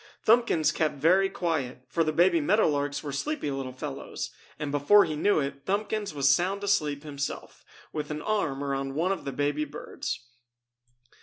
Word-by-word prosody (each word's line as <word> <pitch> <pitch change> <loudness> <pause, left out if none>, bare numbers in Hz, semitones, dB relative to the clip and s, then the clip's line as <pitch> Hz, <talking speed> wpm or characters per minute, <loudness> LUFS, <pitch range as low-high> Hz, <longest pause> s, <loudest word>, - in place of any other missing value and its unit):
Thumbkins 225 -9 +4
kept 155 -2 0
very 180 +7 +4
quiet, 145 -9 -2
for 165 +7 +1
the 155 - 0
baby 170 +1 +4
meadow 210 +9 +3
larks 145 -1 -1
were 145 - -4
sleepy 215 - -2
little 135 -1 -4
fellows, 135 +1 -6 0.3
and 145 -2 -3
before 145 +9 +5
he 155 - -3
knew 200 +4 +3
it 140 -1 -4
Thumbkins 210 +1 -1
was 140 -2 +1
sound 185 +8 +2
asleep 150 -8 +1
himself, 145 -2 -5 0.3
with 150 -1 -3
an 150 0 -4
arm 165 -11 -1
around 135 -1 -2
one 170 +5 +1
of 195 - -3
the 140 - -2
baby 145 +2 0
birds. 145 - -5
150 Hz, 170 wpm, -28 LUFS, 140-190 Hz, 0.3 s, before